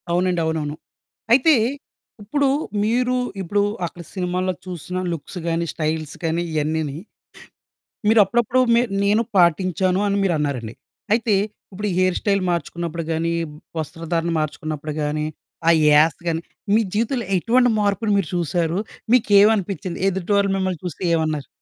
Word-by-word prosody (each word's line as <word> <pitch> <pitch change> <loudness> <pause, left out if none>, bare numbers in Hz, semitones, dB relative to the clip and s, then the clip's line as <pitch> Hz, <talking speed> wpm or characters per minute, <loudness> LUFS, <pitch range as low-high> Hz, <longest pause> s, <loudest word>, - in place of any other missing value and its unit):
అవునండి. 175 0 +1
అవునవును. 155 -2 -2 0.6
అయితే, 280 +5 +6 0.7
ఇప్పుడు 280 +7 +1 0.4
మీరు 245 +3 +1 0.3
ఇప్పుడు 200 +3 0 0.2
అక్కడ 170 +1 -8
సినిమాల్లో 185 0 -1
చూసిన 180 0 -5 0.2
లుక్స్ 165 +3 -7
గానీ, 170 0 0
స్టైల్స్ 155 -1 -2
కానీ 165 +1 0
ఇవన్నీని 155 -1 -1 1.1
మీరు 220 0 +6
అప్పుడప్పుడు 240 +4 +1
మీ 235 - +5 0.2
నేను 210 +3 +3
పాటించాను 185 +1 +3
అని 200 0 +1
మీరన్నారండి. 145 - -1 0.4
అయితే 225 -1 +2 0.4
ఇప్పుడు 210 +3 -3
హెయిర్ 185 -1 +2
స్టైల్ 200 -2 +1
మార్చుకున్నప్పుడు 170 0 -3
గానీ, 165 +1 0 0.5
వస్త్రధారణ 165 +2 -2
మార్చుకున్నప్పుడు 155 0 -4
గానీ, 150 +1 -1 0.4
ఆ - - +8 0.2
యాస 150 +1 +5
గానీ 165 -1 0 0.3
మీ 220 - +5
జీవితంలో 230 +1 0
ఎటువంటి 245 +6 +3
మార్పుని 205 +1 +1
మీరు 185 -6 -1
చూసారు? 170 0 0 0.3
మీకేవనిపించింది? 200 -6 +3
ఎదుటి 190 +1 -2
వాళ్ళు 200 0 +2
మిమ్మల్ని 185 -4 -2
చూస్తే 180 +1 -6
ఏమన్నారు? 155 -3 -1
180 Hz, 125 wpm, -22 LUFS, 160-205 Hz, 1.1 s, ఆ